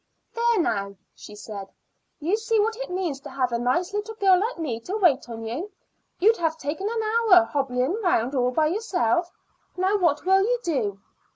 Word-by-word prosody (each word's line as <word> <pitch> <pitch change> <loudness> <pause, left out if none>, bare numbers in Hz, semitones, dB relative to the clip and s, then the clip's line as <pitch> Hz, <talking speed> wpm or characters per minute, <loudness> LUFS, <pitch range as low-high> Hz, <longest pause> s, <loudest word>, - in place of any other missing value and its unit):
"There, 470 -2 +2
now," 200 - -1 0.2
she 210 - -12
said. 205 -2 -8 0.5
"You 335 +7 +1
see 450 0 0
what 445 +2 +1
it - - -6
means 360 -6 -2
to 285 - -10
have 255 -2 -1
a 235 - -1
nice 300 +11 0
little 420 +2 -3
girl 385 -3 +4
like 440 +3 -2
me 275 -9 -3
to 370 - -4
wait 290 - +2
on 225 -1 -7
you. 275 - -5 0.5
You'd 445 +5 +4
have 325 -1 -1
taken 320 +8 -3
an 455 -1 -2
hour 435 -5 +5
hobbling 275 - -1
round 270 - +1
all 250 -2 +2
by 305 +5 +1
yourself. 345 - 0 0.5
Now 380 +3 +2
what 335 -4 +1
will 385 +1 +5
you 485 +5 +1
do?" 215 - -2
345 Hz, 190 wpm, -24 LUFS, 250-415 Hz, 0.5 s, hour